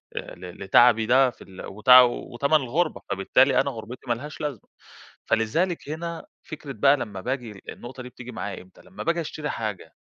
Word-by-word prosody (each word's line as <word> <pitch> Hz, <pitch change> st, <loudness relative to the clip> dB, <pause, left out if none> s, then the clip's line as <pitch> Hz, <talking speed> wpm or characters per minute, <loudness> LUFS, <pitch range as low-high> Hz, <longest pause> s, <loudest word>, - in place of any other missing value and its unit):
آآ، -, -, -6 dB
ل 90 Hz, +1 st, -10 dB
لتعبي 115 Hz, +3 st, +5 dB
ده 130 Hz, +2 st, +5 dB
في -, -, -14 dB
ال 95 Hz, -1 st, -10 dB
وت 105 Hz, +5 st, -6 dB
وتمن 125 Hz, +3 st, +5 dB
الغربة، 150 Hz, +5 st, 0 dB
فبالتالي 130 Hz, +8 st, +3 dB
أنا 140 Hz, 0 st, -2 dB
غربتي 120 Hz, +3 st, -9 dB
مالهاش 140 Hz, +7 st, -4 dB
لازمة، 145 Hz, -8 st, -5 dB, 0.6 s
فلذلك 150 Hz, +9 st, 0 dB
هنا 165 Hz, +2 st, -5 dB, 0.2 s
فكرة 150 Hz, -3 st, -8 dB
بقى 135 Hz, +5 st, +4 dB
لمّا 100 Hz, -7 st, -6 dB
باجي 120 Hz, -5 st, -4 dB
النقطة 125 Hz, +1 st, -9 dB
دي 125 Hz, -, -9 dB
بتيجي 125 Hz, 0 st, -10 dB
معايا 105 Hz, -3 st, -6 dB
إمتى؟ 95 Hz, -, -20 dB
لمّا 195 Hz, -, -9 dB
باجي 170 Hz, 0 st, 0 dB
أشتري 150 Hz, -1 st, -5 dB
حاجة، 110 Hz, -4 st, -5 dB
125 Hz, 170 wpm, -25 LUFS, 110-145 Hz, 0.6 s, لتعبي